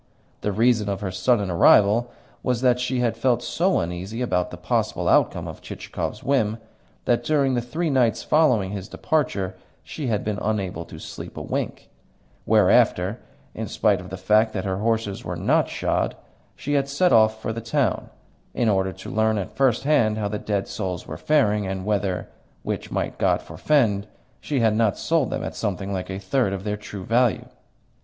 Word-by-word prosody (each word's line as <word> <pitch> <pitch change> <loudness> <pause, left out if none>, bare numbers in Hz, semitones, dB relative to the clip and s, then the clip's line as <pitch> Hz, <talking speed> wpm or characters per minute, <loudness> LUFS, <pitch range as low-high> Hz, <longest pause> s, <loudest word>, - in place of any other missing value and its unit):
The 105 - -1
reason 110 0 +2
of 100 0 -3
her 95 -2 -3
sudden 100 +1 +1
arrival 105 +7 +5 0.3
was 125 -2 -1
that 125 -1 +3
she 125 0 -1
had 115 -2 +1
felt 120 +1 +1
so 185 +3 +1
uneasy 90 +7 -4
about 90 -6 0
the - - -8
possible - - -1
outcome - - +2
of - - -8
Chichikov's - - -5
whim, 115 -6 +1 0.5
that 120 0 +2
during 140 -1 +2
the 120 - +1
three 155 +7 -2
nights 125 -4 +2
following 125 -12 +3
his 100 -2 -5
departure 100 -12 -1 0.3
she 150 -4 -5
had 105 -3 0
been 105 -1 -2
unable 95 -6 -2
to - - -11
sleep - - -9
a - - -4
wink; - - -4 0.6
whereafter, 95 +6 +3 0.3
in - - -5
spite 100 -3 +1
of 90 - -10
the 95 - -6
fact 110 +4 +3
that 95 -2 -3
her 95 -1 -1
horses 110 -1 -1
were - - -4
not - - +2
shod, - - -1 0.4
she 145 - -3
had 140 -1 +1
set 175 +6 +2
off 110 -1 +4
for 110 - -3
the 115 - -5
town, 115 - 0 0.5
in 120 - +1
order 95 -2 +1
to - - -9
learn 110 0 +2
at 95 - -5
first 130 -4 +2
hand 115 -8 +3
how 105 -1 -1
the 105 +1 -3
dead 100 -2 -2
souls 90 -4 -4
were - - -7
faring, 105 -10 +2
and 95 0 -4
whether 100 -3 -1 0.4
(which - - -4
might - - -3
God - - +2
forfend!) 110 -9 +1 0.3
she 140 -4 -1
had 110 -2 +3
not 110 -3 +2
sold 160 -5 +1
them - - -3
at - - -4
something 100 -2 -3
like 95 -1 -4
a 95 - -4
third 100 +2 0
of 95 -1 -4
their 105 0 -2
true 105 -2 -8
value. 115 -3 +2
110 Hz, 190 wpm, -24 LUFS, 100-125 Hz, 0.6 s, arrival